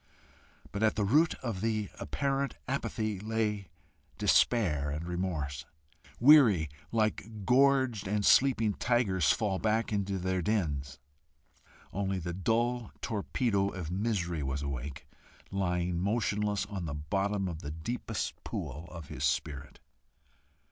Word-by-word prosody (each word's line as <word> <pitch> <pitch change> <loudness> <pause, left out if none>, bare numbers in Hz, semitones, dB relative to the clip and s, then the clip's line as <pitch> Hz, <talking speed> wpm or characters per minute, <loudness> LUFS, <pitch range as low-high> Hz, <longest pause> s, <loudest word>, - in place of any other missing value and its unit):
But 100 - -4
at 110 -1 +3
the 105 - +1
root 155 +11 +4
of 110 -7 -3
the 110 -2 -1
apparent 140 0 -1
apathy 110 -6 -2
lay 105 -2 -1 0.5
despair 80 -12 +3
and 75 +3 -4
remorse, 80 -6 -3 0.6
weary, 115 - +7 0.2
like 110 -2 -1
gorged 130 -4 +3
and 105 +1 0
sleeping 115 -6 +5
tigers 100 -9 +2
far 100 -5 0
back 110 0 0
in 100 -1 +1
their 95 -1 -1
dens. 75 -9 -1 1.0
Only 95 -1 -1
the 85 -1 -4
dull 115 +5 0
torpedo 105 -2 0
of 90 -5 -6
misery 90 -5 -1
was 70 +1 -2
awake, 70 +1 -5 0.4
lying 90 -2 0
motionless 105 0 0
on 100 -3 -5
the 75 -3 -4
bottom 95 +6 -1
of 85 -3 -5
the 75 - -6
deepest 105 +7 -4
pool 80 +4 -5
of 85 -4 -9
his 65 - -5
spirit. 70 0 -2
100 Hz, 125 wpm, -31 LUFS, 85-110 Hz, 1.0 s, weary